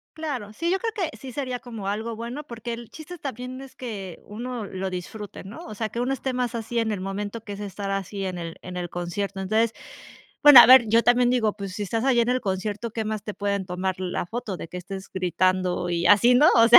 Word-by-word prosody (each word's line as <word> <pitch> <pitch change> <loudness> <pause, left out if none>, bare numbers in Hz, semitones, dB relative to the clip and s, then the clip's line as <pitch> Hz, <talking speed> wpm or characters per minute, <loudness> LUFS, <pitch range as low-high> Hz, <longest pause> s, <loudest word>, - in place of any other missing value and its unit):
Claro, 280 -10 -4
sí, 335 +11 -1
yo 380 - +2
creo 450 +1 -2 0.2
que - - -12
sí 265 -2 -9
sería 255 -1 -3
como 225 -6 -7
algo 220 +3 -2
bueno 235 +6 -5
porque, 235 -3 -6
el 230 -1 -8
chiste 325 +3 -10
también 255 -1 -6
es 270 -1 -12
que 200 -8 -6
uno 235 +1 -5
lo 190 -1 -4
disfrute, 190 +3 -7
¿no? 195 +4 -9
O 215 - -8
sea, 220 +1 -2
que 235 - -5
uno 250 +2 0
esté 265 -1 -3
más 250 -1 -1
así 230 +1 -2
en 225 -1 0
el 205 - -2
momento 205 +3 -4
que 205 - -6
es 200 - -8
estar 200 -1 -4
así 195 0 -3
en 185 -2 -3
el 165 -1 -6
en 180 0 -6
el 175 -1 -3
concierto, 195 +3 -3
entonces, 220 +4 +2 0.7
bueno, 290 -4 +12
a - - +10
ver, 255 -2 +9
yo 225 +2 +4
también 245 0 +4
digo, 225 -4 +2
pues, 200 -2 -6
si 205 - -4
estás 225 +4 -1
allí 260 -3 +4
en 235 - +1
el 255 +1 +1
concierto, 205 +3 -2
¿qué 220 0 -3
más 215 -1 -2
te 210 - -4
pueden 200 -1 -1
tomar 185 0 -2
la 180 -1 -2
foto 210 -2 -4
de - - -7
que 180 - -8
estés 190 +2 -7
gritando 185 -1 +1
y 170 0 0
así, 215 +6 +6
no?, 290 +5 +7
o 230 0 +7
sea, 235 - +12
215 Hz, 245 wpm, -25 LUFS, 195-245 Hz, 0.7 s, bueno